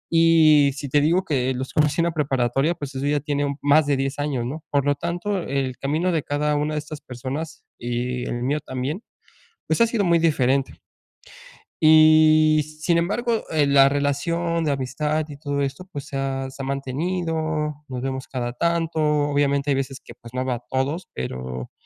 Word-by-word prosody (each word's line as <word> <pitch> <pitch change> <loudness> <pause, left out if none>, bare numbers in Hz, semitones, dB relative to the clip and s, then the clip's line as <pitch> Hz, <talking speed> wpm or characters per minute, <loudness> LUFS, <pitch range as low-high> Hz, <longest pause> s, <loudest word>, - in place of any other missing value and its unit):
y 155 -3 +6
si 140 -1 -6
te 145 +2 +3
digo 170 +5 +2
que 130 -5 0
los 130 +1 -5
conocí 150 +2 +2
en - - +2
la 170 - 0
preparatoria, 135 +1 0
pues 145 -3 -7
eso 135 - -2
ya 145 0 +2
tiene 145 0 -1
un 140 -1 -3
más 145 +1 +4
de 140 -2 +2
10 135 +1 -2
años, 140 -5 -1
¿no?, 155 +5 -5
por 140 -1 +1
lo 145 0 +2
tanto, 175 +6 -2
el 135 -3 -2
camino 155 +6 0
de 155 - 0
cada 150 +1 0
una 150 +1 -1
de - - 0
estas 150 0 -8
personas 135 +6 -6 0.2
y 125 +1 -3
el 120 0 -3
mío 145 +4 0
también, 135 - -4 0.7
pues 160 - +1
ha 230 - +6
sido 225 -3 0
muy 170 -1 +4
diferente. 135 -4 +1 1.1
Y 155 0 +6 0.2
sin 170 +2 +2
embargo, 225 +6 0
eh, 150 -3 +2
la 140 -1 +6
relación 165 +4 -1
de 150 - +1
amistad 150 +3 -1
y 145 - -9
todo 145 -1 -2
esto, 140 +7 -3
pues 140 -2 -6
se 140 - -5
ha 135 -1 -2
se 135 +1 -9
ha - - -4
mantenido, 150 +2 -2
nos 125 -1 -5
vemos 130 0 -4
cada 120 -2 -4
tanto, 165 +3 0
obviamente 145 -1 +1
hay 135 - +3
veces 135 0 -3
que - - -13
pues 120 0 -14
no 130 0 -2
veo 125 -2 0
a - - -7
todos, 140 +7 -2
pero, 65 -1 -5
145 Hz, 195 wpm, -23 LUFS, 135-155 Hz, 1.1 s, y